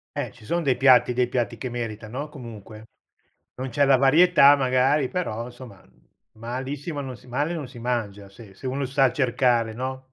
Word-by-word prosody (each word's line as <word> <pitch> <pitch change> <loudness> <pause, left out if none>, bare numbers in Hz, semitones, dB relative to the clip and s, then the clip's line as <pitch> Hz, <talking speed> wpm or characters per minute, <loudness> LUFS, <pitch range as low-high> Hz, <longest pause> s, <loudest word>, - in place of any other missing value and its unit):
Eh, - - -4
ci - - -18
son 170 +9 -1
dei 130 -3 +2
piatti 125 -2 +5
dei 125 0 +1
piatti 120 -1 -2
che 125 - -4
merita, 115 -2 -5
no, 140 +7 -5
comunque? 110 -5 -11 0.7
Non 130 +1 -5
c'è 140 +4 +2
la 135 -1 +5
varietà 145 +1 +6
magari, 130 +1 +2
però, 120 -10 -4
somma 120 -6 -13 0.5
malissimo 130 +7 -5
non 130 -3 -6
si - - -20
male 145 +7 -2
non 150 -5 -5
si 125 - -12
mangia 105 -5 -3
se 100 -1 -15
se 130 - -10
uno 135 +2 -2
sa 135 -1 +2
cercare, 120 -4 +1
no? 130 +1 -6
130 Hz, 185 wpm, -24 LUFS, 115-140 Hz, 0.7 s, varietà